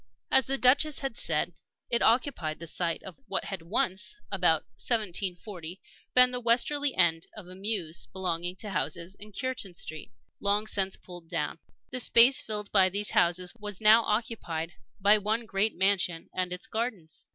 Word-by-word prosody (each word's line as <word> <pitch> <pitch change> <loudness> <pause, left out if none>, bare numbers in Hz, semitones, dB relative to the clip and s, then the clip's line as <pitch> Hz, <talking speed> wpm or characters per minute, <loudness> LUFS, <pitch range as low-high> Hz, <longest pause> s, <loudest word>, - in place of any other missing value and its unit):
As 265 - +4
the 270 +1 0
Duchess 280 +4 +4
had 270 -4 -4
said, - - 0 0.4
it 235 - +2
occupied 230 - +1
the 170 - -8
site 165 +1 -2
of 190 -3 -10
what 195 - -1
had 195 -4 -5
once 190 +3 -1
about 175 -4 +3
1740 185 - -3 0.4
been 250 0 +7
the 250 - -1
westerly 255 +4 +1
end 165 -2 +3
of 200 -4 -10
a 180 - -11
mews 190 -4 -2
belonging 175 -1 -3
to 210 +2 -6
houses 170 +2 -3
in 210 +1 -10
Cureton 250 -5 -3
Street, 155 -7 -4 0.3
long 205 +1 +1
since 195 -3 -1
pulled 175 -2 -12
down. 150 +1 -3 0.3
The 255 - -3
space 245 +2 +7
filled 210 -2 -4
by 190 -2 +5
these 200 +2 -2
houses 175 +1 +1
was 210 -4 -8
now 220 +2 +7
occupied 210 -8 -2 0.3
by 205 +2 +5
one 220 +3 -1
great 210 +1 0
mansion 185 -3 +1
and 185 -1 -2
its 180 +1 -5
gardens. 195 -10 -5
195 Hz, 165 wpm, -28 LUFS, 175-225 Hz, 0.4 s, been